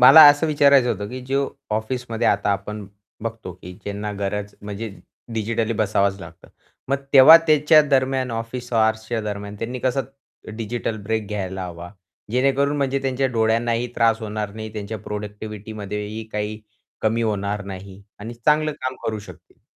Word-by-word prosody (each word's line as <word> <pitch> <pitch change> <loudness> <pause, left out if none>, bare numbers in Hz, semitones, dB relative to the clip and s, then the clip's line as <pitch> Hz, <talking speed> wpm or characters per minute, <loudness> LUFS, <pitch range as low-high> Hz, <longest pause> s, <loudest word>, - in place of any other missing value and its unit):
मला 135 +5 +10
असं 145 +2 +6
विचारायचं 140 -4 +5
होतं 105 0 -5
की 130 +3 -6
जो 135 +1 +1 0.2
ऑफिसमध्ये 115 +1 -2
आता - - +2
आपण 105 +1 -5 0.4
बघतो 110 -4 -5
की 90 - -8
ज्यांना 105 +1 -4
गरज 100 0 -3
म्हणजे 105 +2 -5 0.5
डिजिटली 115 +1 -1
बसावंच 100 -2 +1
लागतं 85 -1 -12 0.4
मग 135 - +2 0.2
तेव्हा 140 +4 +11
त्याच्या 155 0 +6
दरम्यान 130 -2 +1
ऑफिस 115 +2 -5
हॉर्सच्या 110 0 +1
दरम्यान 105 -1 -5
त्यांनी 120 +3 -4
कसं 130 +2 +1 0.6
डिजिटल 115 0 -3
ब्रेक 110 +1 -2
घ्यायला 95 -2 -3
हवा 85 0 -8 0.4
जेणेकरून 135 +4 +2
म्हणजे 140 -1 0
त्यांच्या 135 0 +1
डोळ्यांनाही 115 +1 +1
त्रास 115 -1 +3
होणार 105 -2 -4
नाही 110 0 -7
त्यांच्या 110 0 -5
प्रोडक्टिव्हिटीमध्ये 105 0 -6
ही 110 +2 -6
काही 105 +1 -3 0.4
कमी 110 +1 +1
होणार 105 -1 -1
नाही 95 0 -9 0.2
आणि 115 +3 -6
चांगलं 150 +6 +2
काम 130 0 -2
करू 110 -1 -1
शकतील 105 - -14
110 Hz, 150 wpm, -22 LUFS, 105-125 Hz, 0.6 s, तेव्हा